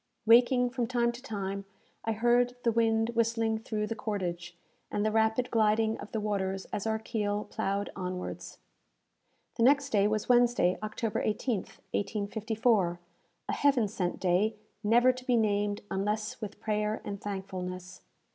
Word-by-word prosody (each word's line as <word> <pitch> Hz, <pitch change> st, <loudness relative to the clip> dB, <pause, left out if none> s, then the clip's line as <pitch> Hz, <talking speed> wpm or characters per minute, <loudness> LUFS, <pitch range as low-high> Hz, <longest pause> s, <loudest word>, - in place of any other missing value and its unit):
Waking 245 Hz, +2 st, +5 dB
from 245 Hz, -2 st, -1 dB
time 235 Hz, -1 st, +1 dB
to 240 Hz, +1 st, -10 dB
time, 200 Hz, -5 st, -4 dB, 0.4 s
I 225 Hz, -, +1 dB
heard 240 Hz, +2 st, +2 dB
the 235 Hz, -, +3 dB
wind 225 Hz, 0 st, +2 dB
whistling 230 Hz, -1 st, +1 dB
through 215 Hz, -1 st, -2 dB
the 220 Hz, -, -3 dB
cordage, 180 Hz, -5 st, -4 dB, 0.3 s
and 205 Hz, -, -1 dB
the 215 Hz, -, +2 dB
rapid 220 Hz, +3 st, +1 dB
gliding 220 Hz, 0 st, +2 dB
of -, -, -9 dB
the 220 Hz, -, -1 dB
waters 195 Hz, -2 st, -2 dB
as 205 Hz, -, -2 dB
our 220 Hz, 0 st, +1 dB
keel 210 Hz, -2 st, -2 dB
ploughed 200 Hz, +1 st, -2 dB
onwards. 180 Hz, -1 st, -5 dB, 1.0 s
The 230 Hz, -, +2 dB
next 280 Hz, +2 st, +4 dB
day 205 Hz, -1 st, +4 dB
was 215 Hz, 0 st, -1 dB
Wednesday, 240 Hz, -7 st, +4 dB
October 215 Hz, +1 st, -2 dB
18th, 215 Hz, -1 st, -2 dB
1854 210 Hz, -2 st, 0 dB, 0.5 s
a -, -, -1 dB
heaven 270 Hz, -6 st, +3 dB
sent 190 Hz, -4 st, -3 dB
day, 190 Hz, +4 st, +2 dB, 0.3 s
never 240 Hz, +4 st, +5 dB
to 255 Hz, 0 st, -10 dB
be 250 Hz, -1 st, +2 dB
named 205 Hz, -2 st, +1 dB
unless 210 Hz, +3 st, -2 dB
with 210 Hz, -1 st, -6 dB
prayer 210 Hz, 0 st, -1 dB
and 200 Hz, -1 st, -5 dB
thankfulness! 185 Hz, -2 st, -6 dB
215 Hz, 150 wpm, -30 LUFS, 200-230 Hz, 1.0 s, Waking